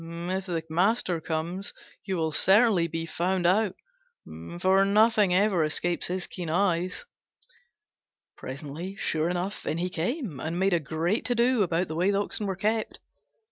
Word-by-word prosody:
If 175 +3 -4
the 165 -3 -2
master 180 +1 +1
comes, 165 +4 -3 0.3
you 190 -2 -2
will 160 -1 0
certainly 195 +1 +4
be 165 0 -4
found 180 +2 -1
out, 190 +2 +3 0.8
for 190 +2 +4
nothing 210 0 +4
ever 190 -2 +3
escapes 170 +3 0
his 180 0 -2
keen 175 -3 -6
eyes." 180 - 0 1.3
Presently, 150 +7 -7
sure 160 -3 0
enough, 180 +3 -3
in 155 - -1
he 180 +1 -2
came, 185 - -3
and 165 +4 -3
made 190 +1 +2
a 170 - +3
great 165 - -1
to 245 - +1
do 240 0 +3
about 175 -1 +1
the - - -5
way 180 +4 +2
the 200 0 +2
Oxen 205 0 -2
were 190 - -2
kept. 215 +3 -1
180 Hz, 160 wpm, -27 LUFS, 165-200 Hz, 1.3 s, certainly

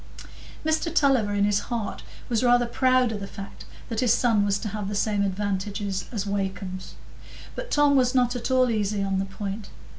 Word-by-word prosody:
Mr 315 +1 +1
Tulliver 270 -9 +3
in 200 - +2
his 205 0 +3
heart 235 -4 -3 0.3
was 235 0 0
rather 245 0 +4
proud 255 0 +2
of 210 - -4
the 195 - -6
fact 195 0 -9 0.2
that 225 -2 -3
his 245 -2 +3
son 230 -3 +3
was 200 -1 +1
to 215 - -4
have 210 -1 -4
the 205 - -3
same 205 0 +1
advantages 200 0 -2
as 210 -4 -3
Wakem's; 190 -2 -4 0.6
but - - -6
Tom 290 -1 +4
was 255 -1 +3
not 245 -1 +3
at 240 +1 -3
all 255 -1 +3
easy 205 -2 0
on 195 -1 0
the 195 - -1
point. 195 +1 -6
210 Hz, 190 wpm, -25 LUFS, 200-245 Hz, 0.6 s, rather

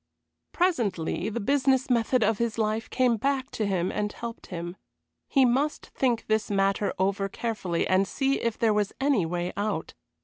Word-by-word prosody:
Presently 220 - 0
the 220 - -3
business 265 +3 +2
method 245 0 +2
of 215 0 +1
his 235 -1 -1
life 220 0 -1
came 250 -3 +2
back 270 +2 -1
to 215 - -1
him 185 -2 0
and 210 0 -2
helped 235 +1 -7
him. 175 0 -5 0.5
He 270 -2 +4
must 270 +5 +1
think 245 -4 +1
this 220 +1 0
matter 195 0 +1
over 195 +1 0
carefully 210 -6 -2
and 190 +1 +3
see 270 +4 0
if 230 -2 -1
there 225 -2 +3
was 210 -1 0
any 270 - +2
way 175 +1 -2
out. 205 +1 -2
220 Hz, 170 wpm, -27 LUFS, 195-255 Hz, 0.5 s, He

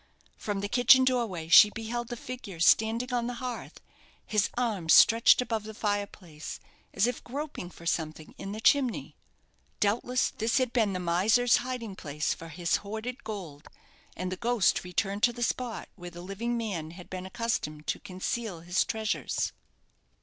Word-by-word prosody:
From 205 -2 -3
the 205 - -2
kitchen 250 +3 +6
doorway 230 -11 0
she 190 +5 +9
beheld 225 +2 -4
the 240 0 -6
figure 235 -8 -8
standing 225 +7 +3
on 240 -1 0
the 245 - -4
hearth, 250 -1 -6 0.5
his 210 -1 +1
arms 210 -10 +3
stretched 230 +2 +6
above 225 -3 -2
the 220 0 -9
fireplace, 200 -7 -4 0.3
as - - +2
if 245 -1 -2
groping 280 - -5
for 170 - -14
something 155 -2 -2
in 195 - -5
the 215 - -5
chimney. 255 0 +2 0.6
Doubtless 240 +5 +1
this 225 +1 0
had 255 -3 +1
been 220 -5 +2
the 185 - -2
miser's 205 +8 +3
hiding 240 -5 -5
place 150 -2 -2
for 165 - -10
his 170 +2 0
hoarded 220 +5 -6
gold, 170 -9 -7 0.5
and 185 0 -3
the 185 - -3
ghost 240 -2 +2
returned 195 +3 -2
to 240 - +4
the 240 0 -3
spot 240 -2 -2
where 175 -2 -8
the 175 0 -10
living 215 +6 -3
man 190 -9 -3
had 175 +2 -11
been 185 0 -6
accustomed 190 -9 -3
to - - -2
conceal 190 0 -4
his 175 +2 +1
treasures. 220 -1 -2
215 Hz, 165 wpm, -29 LUFS, 180-240 Hz, 0.6 s, she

